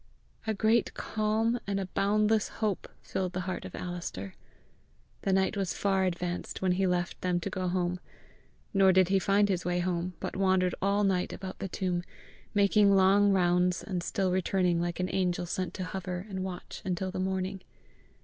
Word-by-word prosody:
A 220 Hz, -, +1 dB
great 220 Hz, +3 st, +2 dB
calm 220 Hz, +2 st, 0 dB
and 200 Hz, 0 st, 0 dB
a 195 Hz, -, -2 dB
boundless 210 Hz, +3 st, +2 dB
hope 215 Hz, -4 st, -2 dB
filled 185 Hz, -1 st, -2 dB
the 185 Hz, -, -2 dB
heart 185 Hz, +1 st, -4 dB
of -, -, -8 dB
Alister. 170 Hz, -, -5 dB, 0.9 s
The 195 Hz, -, 0 dB
night 190 Hz, +2 st, +2 dB
was 195 Hz, -3 st, -1 dB
far 195 Hz, -1 st, +2 dB
advanced 175 Hz, 0 st, -3 dB
when 185 Hz, -1 st, +1 dB
he 190 Hz, +1 st, +2 dB
left 175 Hz, -1 st, -1 dB
them 180 Hz, -1 st, +1 dB
to -, -, -4 dB
go 185 Hz, -1 st, -2 dB
home. 180 Hz, 0 st, 0 dB, 0.7 s
Nor 195 Hz, -1 st, +5 dB
did 185 Hz, -1 st, +4 dB
he 195 Hz, 0 st, +4 dB
find 200 Hz, +2 st, +3 dB
his 185 Hz, -3 st, -1 dB
way 175 Hz, 0 st, 0 dB
home, 180 Hz, 0 st, -1 dB
but -, -, -4 dB
wandered 185 Hz, -2 st, +2 dB
all 200 Hz, +1 st, +2 dB
night 190 Hz, -2 st, +1 dB
about 190 Hz, -1 st, -7 dB
the -, -, -3 dB
tomb, 180 Hz, -1 st, -1 dB, 0.5 s
making 200 Hz, 0 st, +5 dB
long 195 Hz, +2 st, +5 dB
rounds 180 Hz, -1 st, +2 dB
and 185 Hz, -3 st, -3 dB
still 190 Hz, +1 st, 0 dB
returning 180 Hz, -1 st, +1 dB
like 175 Hz, 0 st, -2 dB
an 185 Hz, 0 st, -1 dB
angel 180 Hz, -2 st, 0 dB
sent 185 Hz, +1 st, -3 dB
to 185 Hz, -, -3 dB
hover 180 Hz, 0 st, -4 dB
and 190 Hz, -2 st, -4 dB
watch 185 Hz, -1 st, -6 dB
until 185 Hz, 0 st, -2 dB
the 185 Hz, -, -4 dB
morning. 190 Hz, 0 st, -2 dB
185 Hz, 180 wpm, -30 LUFS, 180-195 Hz, 0.9 s, Nor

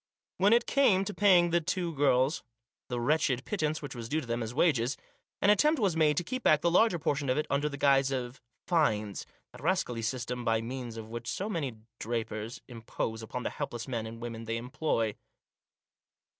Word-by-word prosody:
When 200 Hz, +3 st, +5 dB
it 235 Hz, +1 st, +5 dB
came 200 Hz, -9 st, +3 dB
to 205 Hz, -, -4 dB
paying 180 Hz, -5 st, +5 dB
the 170 Hz, 0 st, +3 dB
two 170 Hz, +1 st, -2 dB
girls 135 Hz, 0 st, +2 dB, 0.5 s
the 125 Hz, -1 st, -3 dB
wretched 130 Hz, -1 st, +1 dB
pittance 155 Hz, -6 st, -2 dB
which 145 Hz, -, -6 dB
was 115 Hz, -2 st, -7 dB
due 155 Hz, -, +1 dB
to 150 Hz, -, -6 dB
them 120 Hz, 0 st, -2 dB
as 110 Hz, 0 st, -3 dB
wages, 130 Hz, -3 st, +2 dB, 0.5 s
an 205 Hz, -, +6 dB
attempt 300 Hz, +8 st, +3 dB
was 195 Hz, -7 st, +1 dB
made 150 Hz, -2 st, +3 dB
to -, -, +1 dB
keep 255 Hz, +7 st, -4 dB
back 155 Hz, -8 st, +4 dB
the 170 Hz, -, +2 dB
larger 185 Hz, 0 st, +4 dB
portion 145 Hz, -3 st, -1 dB
of 130 Hz, -, +2 dB
it 150 Hz, -, 0 dB
under 145 Hz, +2 st, +1 dB
the 140 Hz, -, -6 dB
guise 135 Hz, -1 st, +4 dB
of 130 Hz, -1 st, -4 dB
" -, -, -50 dB
fines," 110 Hz, -, +1 dB, 0.2 s
that -, -, -13 dB
rascally 120 Hz, -2 st, 0 dB
system 125 Hz, +1 st, -3 dB
by 115 Hz, -1 st, +2 dB
means 120 Hz, 0 st, -6 dB
of 110 Hz, 0 st, -8 dB
which 115 Hz, 0 st, -5 dB
so 200 Hz, -, -3 dB
many 145 Hz, -, -3 dB, 0.2 s
drapers 115 Hz, 0 st, -4 dB
impose 115 Hz, -1 st, -4 dB
upon 125 Hz, +3 st, -5 dB
the -, -, -2 dB
helpless 120 Hz, -2 st, -5 dB
men 115 Hz, -4 st, -3 dB
and 115 Hz, +1 st, -9 dB
women 115 Hz, -1 st, -6 dB
they 115 Hz, +1 st, -2 dB
employ. 125 Hz, -3 st, -1 dB
135 Hz, 200 wpm, -30 LUFS, 115-165 Hz, 0.5 s, an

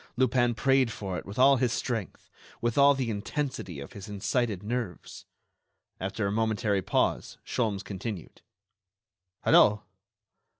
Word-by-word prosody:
Lupin 120 Hz, -2 st, +2 dB
prayed 135 Hz, 0 st, +3 dB
for 95 Hz, -5 st, -4 dB
it -, -, -12 dB
with 100 Hz, -, -8 dB
all 135 Hz, +2 st, +6 dB
his 125 Hz, -2 st, +1 dB
strength, 115 Hz, -5 st, -4 dB, 0.3 s
with 120 Hz, -1 st, -1 dB
all 140 Hz, 0 st, +6 dB
the 130 Hz, -4 st, -1 dB
intensity 105 Hz, -, -4 dB
of 70 Hz, -, -9 dB
his 100 Hz, 0 st, -9 dB
incited 105 Hz, 0 st, -1 dB
nerves! 110 Hz, -5 st, -5 dB, 0.7 s
After 95 Hz, +2 st, -2 dB
a 100 Hz, -, 0 dB
momentary 110 Hz, -2 st, +1 dB
pause, -, -, 0 dB
Sholmes 105 Hz, -5 st, -1 dB
continued: 100 Hz, -2 st, -7 dB, 1.0 s
"Hello!... 105 Hz, 0 st, +5 dB
110 Hz, 130 wpm, -28 LUFS, 100-125 Hz, 1.0 s, all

